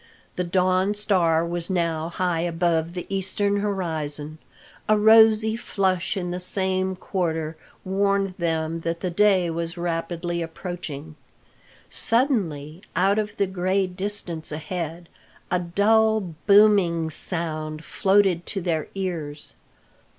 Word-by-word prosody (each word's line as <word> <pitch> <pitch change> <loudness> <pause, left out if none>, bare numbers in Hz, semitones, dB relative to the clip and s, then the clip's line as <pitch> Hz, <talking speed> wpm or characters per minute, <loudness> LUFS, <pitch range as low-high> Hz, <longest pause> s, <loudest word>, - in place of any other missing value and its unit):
The 180 - -1
dawn 185 +3 +1
star 175 -6 +3
was 170 +1 -4
now 165 -3 -1
high 175 -1 -1
above 170 -1 0
the 180 -1 -5
eastern 195 +1 0
horizon. 160 -7 -3 0.5
A 215 - +5
rosy 220 0 +6
flush 190 -4 -1
in 180 -2 -3
the 180 - -3
same 190 0 +1
quarter 165 -4 -2 0.3
warned 195 0 +1
them 165 -1 -1
that 170 +2 -3
day 190 -4 +3
was 170 +1 -4
rapidly 170 0 -2
approaching. 160 -3 -6 0.7
Suddenly, 185 - 0
out 195 +4 +3
of 210 0 -4
the 200 - +2
gray 190 +1 0
distance 185 -3 -4
ahead, 165 +2 -5 0.4
a 180 - +2
dull 205 +1 +2
booming 200 -6 +5
sound 155 -2 -4
floated 190 -3 +2
to 195 - -3
their 165 -3 -1
ears. 165 -6 -5
180 Hz, 115 wpm, -24 LUFS, 165-195 Hz, 0.7 s, rosy